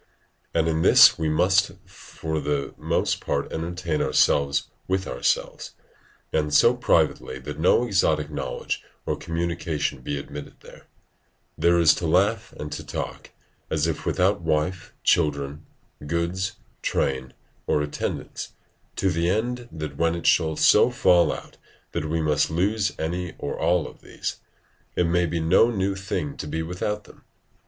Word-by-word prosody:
And 80 Hz, -, +1 dB
in 80 Hz, 0 st, +1 dB
this -, -, +7 dB
we 80 Hz, -1 st, 0 dB
must 95 Hz, +5 st, +3 dB
for 80 Hz, -1 st, -5 dB
the 70 Hz, -1 st, -2 dB
most -, -, -1 dB
part -, -, -2 dB
entertain 85 Hz, -1 st, -2 dB
ourselves 70 Hz, 0 st, +2 dB, 0.2 s
with 95 Hz, 0 st, 0 dB
ourselves, -, -, -2 dB, 0.6 s
and 75 Hz, -1 st, +1 dB
so 115 Hz, +11 st, +6 dB
privately 80 Hz, -, +1 dB
that 75 Hz, +3 st, -7 dB
no 90 Hz, +8 st, +4 dB
exotic 80 Hz, -8 st, +1 dB
knowledge 70 Hz, -3 st, -4 dB, 0.2 s
or -, -, 0 dB
communication 80 Hz, -5 st, -2 dB
be 70 Hz, +3 st, -3 dB
admitted 70 Hz, +1 st, -8 dB
there; -, -, -15 dB, 0.7 s
there 85 Hz, +2 st, +3 dB
to 80 Hz, +2 st, +4 dB
laugh 100 Hz, +7 st, +2 dB
and 75 Hz, 0 st, -7 dB
to -, -, -5 dB
talk, -, -, -6 dB, 0.4 s
as 80 Hz, -1 st, +1 dB
if 80 Hz, -2 st, -2 dB
without 95 Hz, +1 st, +1 dB
wife, 80 Hz, +2 st, -1 dB
children, 75 Hz, -2 st, +1 dB, 0.4 s
goods, 85 Hz, +4 st, -1 dB, 0.3 s
train, 65 Hz, -1 st, -1 dB, 0.3 s
or 75 Hz, -, +2 dB
attendance, 75 Hz, -, -5 dB, 0.4 s
to 95 Hz, -, +1 dB
the 85 Hz, +1 st, 0 dB
end 120 Hz, +4 st, -1 dB
that 75 Hz, -3 st, -6 dB
when 85 Hz, +1 st, +2 dB
it 85 Hz, -, -6 dB
shall 80 Hz, -2 st, +3 dB
so -, -, +5 dB
fall 90 Hz, -1 st, +4 dB
out -, -, -8 dB, 0.3 s
that 75 Hz, -, -3 dB
we 80 Hz, 0 st, 0 dB
must 75 Hz, -1 st, +2 dB
lose 100 Hz, +5 st, +1 dB
any 90 Hz, +2 st, -3 dB
or 70 Hz, -, -4 dB
all 90 Hz, -3 st, +1 dB
of -, -, -14 dB
these, -, -, -5 dB, 0.6 s
it 90 Hz, -, +2 dB
may 85 Hz, +1 st, +2 dB
be 85 Hz, +1 st, -2 dB
no 80 Hz, +8 st, +4 dB
new 100 Hz, -4 st, 0 dB
thing 95 Hz, -6 st, -3 dB
to -, -, -5 dB
be 80 Hz, +2 st, -2 dB
without 95 Hz, +5 st, -3 dB
them. -, -, -18 dB
80 Hz, 150 wpm, -24 LUFS, 75-90 Hz, 0.7 s, this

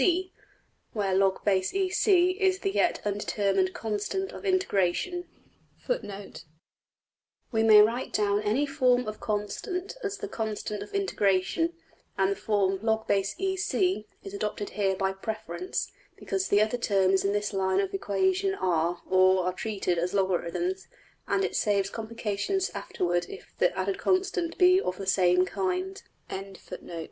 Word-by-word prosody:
png}% 365 Hz, +5 st, +2 dB, 0.6 s
where 200 Hz, -4 st, 0 dB
$\log_\epsilon 195 Hz, -, +1 dB
C$ 365 Hz, -3 st, +4 dB
is 380 Hz, 0 st, +1 dB
the 390 Hz, 0 st, -2 dB
yet 355 Hz, -3 st, +1 dB
undetermined 200 Hz, -2 st, 0 dB
constant\footnote 355 Hz, -, -3 dB, 1.1 s
{We 220 Hz, -2 st, +1 dB
may 215 Hz, -1 st, +8 dB
write 235 Hz, +4 st, -1 dB
down 205 Hz, -1 st, +1 dB
any 215 Hz, +7 st, +1 dB
form 255 Hz, -4 st, +2 dB
of 215 Hz, 0 st, -5 dB
constant 355 Hz, -, -3 dB
as 405 Hz, 0 st, -2 dB
the 420 Hz, -, -5 dB
``constant 215 Hz, -, -4 dB
of 205 Hz, -, -8 dB
integration,'' 330 Hz, -, +1 dB, 0.4 s
and 195 Hz, 0 st, +2 dB
the -, -, 0 dB
form 195 Hz, -3 st, 0 dB
$\log_\epsilon 220 Hz, -, 0 dB
C$ 360 Hz, -, 0 dB, 0.2 s
is 195 Hz, -, -8 dB
adopted 205 Hz, 0 st, -3 dB
here 195 Hz, -2 st, 0 dB
by 190 Hz, 0 st, 0 dB
preference, 220 Hz, -, -4 dB, 0.2 s
because 385 Hz, -1 st, -2 dB
the 205 Hz, +1 st, +4 dB
other 220 Hz, +3 st, -2 dB
terms 195 Hz, -4 st, +2 dB
in 200 Hz, -, +1 dB
this 205 Hz, +1 st, -1 dB
line 190 Hz, 0 st, +1 dB
of 195 Hz, -1 st, -1 dB
equation 380 Hz, -, +1 dB
are, 170 Hz, -, 0 dB
or 185 Hz, 0 st, +4 dB
are 180 Hz, -, 0 dB
treated 190 Hz, -4 st, -2 dB
as 180 Hz, +3 st, -1 dB
logarithms; 195 Hz, -, -1 dB, 0.4 s
and 390 Hz, -, +1 dB
it -, -, -4 dB
saves 200 Hz, -2 st, +1 dB
complications 230 Hz, -, -2 dB
afterward 175 Hz, 0 st, -1 dB
if -, -, -11 dB
the 180 Hz, +1 st, +2 dB
added 190 Hz, +1 st, -1 dB
constant 370 Hz, -2 st, 0 dB
be 365 Hz, 0 st, +6 dB
\emph{of 180 Hz, -, -2 dB
the 195 Hz, -, -5 dB
same 185 Hz, -1 st, +4 dB
kind}.} 185 Hz, 0 st, -2 dB, 0.3 s
of -, -, -2 dB
integration. 195 Hz, -2 st, -10 dB
210 Hz, 140 wpm, -28 LUFS, -, 1.1 s, may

